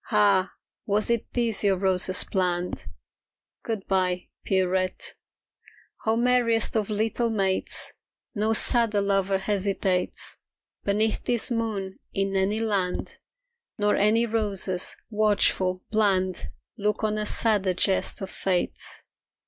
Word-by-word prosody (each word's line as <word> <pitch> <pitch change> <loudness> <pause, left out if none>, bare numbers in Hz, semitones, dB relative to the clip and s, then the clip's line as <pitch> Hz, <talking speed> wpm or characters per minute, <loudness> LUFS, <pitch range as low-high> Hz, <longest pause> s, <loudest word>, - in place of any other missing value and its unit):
Ah, 200 -4 +3 0.3
was 210 +2 +1
it 235 -1 -1
this 230 -4 0
your 195 -2 +3
roses 185 -1 +1
planned? 180 -2 -1 0.7
Good 220 -4 -4
bye, 185 -2 0
Pierrette. 185 -1 0 0.9
Oh, 220 - +4
merriest 235 -2 +2
of 215 -2 0
little 225 +2 0
mates, 195 -4 -1 0.4
No 220 0 +1
sadder 225 -2 +2
lover 195 -1 +1
hesitates 195 -2 -1 0.5
Beneath 210 +2 +1
this 240 0 -1
moon 210 -5 -2
in 195 0 -1
any 195 +3 +1
land; 200 -5 -1 0.6
Nor 205 0 +2
any 220 +3 +3
roses, 200 -5 -1 0.2
watchful, 205 -3 +2
bland, 190 -4 +1 0.3
Look 210 +1 0
on 215 0 +1
a 210 - -2
sadder 200 -5 +1
jest 190 +2 +1
of 190 - -5
Fate's. 185 -2 -2
200 Hz, 115 wpm, -26 LUFS, 190-220 Hz, 0.9 s, Oh